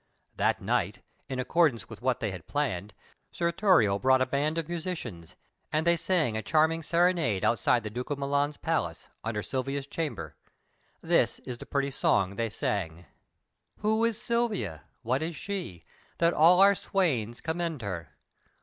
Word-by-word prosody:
That - - +1
night, - - -1 0.3
in 130 - -3
accordance 145 -2 +2
with 110 -1 -11
what 130 -1 0
they 110 -3 -1
had 90 -3 -8
arranged, 105 -9 -1 0.4
Sir 170 0 0
Thurio 170 - +4
brought 130 +2 +4
a - - 0
band 145 +4 0
of 165 -2 -2
musicians, 160 - -5 0.4
and 155 +1 +1
they 170 0 +5
sang 165 -10 +1
a 110 - -1
charming 160 +7 +2
serenade 170 - +2
outside 120 0 +2
the 105 - -5
Duke 125 +3 -5
of 145 - -1
Milan's 145 +1 0
palace, - - -2
under 110 -2 -2
Silvia's 135 +1 -3
chamber. 155 +1 -4 0.7
This - - +2
is 120 -2 -6
the - - -9
pretty 140 0 0
song 100 -7 +1
they 115 +1 -1
sang: 90 -5 -3 0.8
"Who 220 +2 +2
is 230 -2 +1
Silvia? 210 - -1 0.2
What 130 +5 0
is 165 +1 -3
she, 180 - -5 0.3
That 170 0 +3
all 170 +4 +6
our 200 +1 +8
swains 135 - -1
commend 165 -4 -3
her? 85 -6 -5
140 Hz, 160 wpm, -29 LUFS, 110-170 Hz, 0.8 s, our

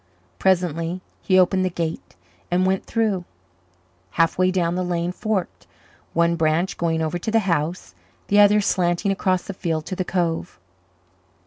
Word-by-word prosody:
Presently 175 - +1 0.2
he 185 - +2
opened 185 +1 +4
the 185 - +1
gate 165 -2 -5 0.3
and 180 +1 +2
went 190 0 0
through. 215 -6 0 0.9
Halfway 175 +2 +3
down 175 -2 0
the 185 +1 -1
lane 175 -1 -1
forked, 205 -1 -3 0.5
one 170 0 +2
branch 165 +3 +1
going 165 -1 0
over 160 +2 -2
to 195 - -3
the 225 0 +3
house, 165 0 -1 0.3
the 205 - +4
other 205 +1 +6
slanting 180 0 +1
across 185 -2 0
the 200 - -6
field 165 -4 -2
to 185 - -4
the 185 - -1
cove. 175 -2 -2
180 Hz, 150 wpm, -22 LUFS, 170-190 Hz, 0.9 s, other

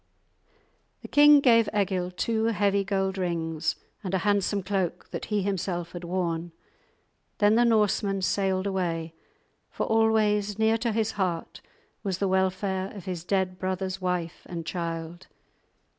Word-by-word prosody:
The - - -7
king 295 0 +7
gave 230 -4 +5
Egil 185 -2 0
two 220 +4 -1
heavy 200 -3 +2
gold 195 -1 -1
rings 165 -3 -1 0.3
and 190 -1 -2
a 190 - -1
handsome 205 -1 +1
cloak 190 -2 -2
that - - -4
he 210 -2 -1
himself 180 -3 -2
had 175 0 -7
worn; 170 -1 -2 0.8
then 205 0 +4
the 235 +2 +4
Norseman 205 -3 +2
sailed 190 0 +1
away, 170 -4 -2 0.6
for - - -3
always 215 -2 +2
near 220 +1 +2
to 235 0 0
his 220 0 0
heart 180 -4 -3 0.4
was 195 -3 -2
the 195 - 0
welfare 190 0 0
of 195 - -9
his 180 -3 -4
dead 185 0 -1
brother's 185 0 -3
wife 180 -2 -2
and 170 -2 -6
child. 165 0 -5
190 Hz, 145 wpm, -27 LUFS, 180-205 Hz, 0.8 s, king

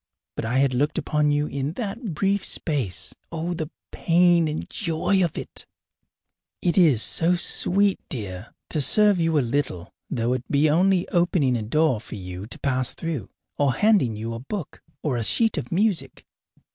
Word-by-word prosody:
But - - -3
I 120 +4 0
had 135 -1 +3
looked 145 +4 0
upon 150 -1 +1
you 145 0 +1
in 140 +1 -3
that 215 - -4
brief 195 +4 +1
space. 135 - -2 0.2
Oh, 170 +1 -3
the 160 -3 -4 0.2
pain 170 -1 +3
and 155 0 -4
joy 185 0 0
of 170 - -2
it! - - -7 0.9
It 175 - 0
is 155 - +5
so 170 +2 +2
sweet, 195 +3 +1
dear, 100 -4 -6 0.2
to 155 - 0
serve 205 +5 +4
you 165 -1 +2
a - - +4
little, 115 -9 -2 0.2
though 120 -1 0
it 130 -1 -2
be 145 +2 +3
only 180 +4 +3
in - - -7
opening 170 -7 +2
a 115 - -1
door 130 +1 +1
for 110 - -9
you 90 0 -7
to 125 - -7
pass 130 -2 -1
through, 155 - -4 0.3
or 140 -3 +3
handing 205 - +3
you 115 +2 -4
a 115 - -5
book 160 - -6 0.2
or 140 -5 0
a 115 - -1
sheet 225 - +2
of 125 - -8
music! 200 0 0
150 Hz, 180 wpm, -24 LUFS, 125-175 Hz, 0.9 s, is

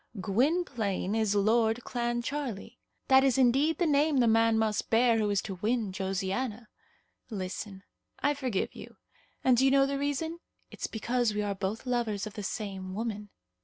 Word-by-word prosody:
Gwynplaine 220 - 0
is 220 -2 +1
Lord 220 +3 +2
Clancharlie. 240 -1 -3 0.3
That 265 -1 +6
is 270 -2 +3
indeed 270 +5 +3
the 350 - +1
name 295 -1 +3
the 250 - +4
man 225 0 +4
must 220 -1 0
bear 230 0 +4
who 210 -1 +1
is 200 -1 +1
to 190 -3 -6
win 220 -2 0
Josiana. 195 +5 -3 0.6
Listen. 195 -1 -5 0.3
I 290 - +1
forgive 255 -9 -2
you; - - -11 0.5
and 255 -2 +4
do 260 - +4
you 270 - +5
know 275 0 +5
the 275 0 -2
reason? 305 +4 -2 0.3
It's - - -4
because 235 0 -1
we 210 - 0
are 205 -1 -1
both 200 +4 -4
lovers 235 -5 -1
of 215 - -7
the 210 - -6
same 190 -2 -5
woman." 210 -2 -4
225 Hz, 165 wpm, -29 LUFS, 205-260 Hz, 0.6 s, That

